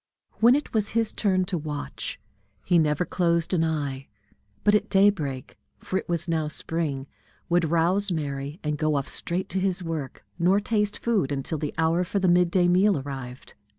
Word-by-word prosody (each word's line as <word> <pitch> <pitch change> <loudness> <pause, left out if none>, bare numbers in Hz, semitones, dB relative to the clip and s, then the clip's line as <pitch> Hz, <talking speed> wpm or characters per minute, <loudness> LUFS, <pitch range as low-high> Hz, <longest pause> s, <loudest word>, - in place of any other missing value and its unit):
When 235 +3 +6
it 295 - -3
was 215 -2 0
his 225 -1 +1
turn 185 -3 +1
to 180 -2 -2
watch, 150 -1 -5 0.5
he 175 -1 +4
never 150 +2 +1
closed 170 -1 +1
an 165 -3 +2
eye, 145 -4 -2 0.6
but 205 - +4
at 210 - +2
daybreak 185 -10 +1 0.2
for - - -6
it - - -11
was 170 0 -1
now 160 -2 0
spring 150 -3 -2 0.4
would 170 -2 +2
rouse 180 +5 +2
Mary, 145 -1 -4
and 150 -1 -2
go 155 -1 +1
off 140 -1 -1
straight 185 +3 -2
to 190 - -1
his 185 -1 -1
work, 160 -6 -5
nor 185 +4 +4
taste 210 -1 0
food 210 - 0
until 140 +3 -2
the 150 -1 -4
hour 160 +2 +2
for 185 +3 -3
the 190 -1 +2
mid 175 0 +4
day 175 0 +3
meal 185 +1 +4
arrived. 135 -2 -7
170 Hz, 185 wpm, -25 LUFS, 150-190 Hz, 0.6 s, When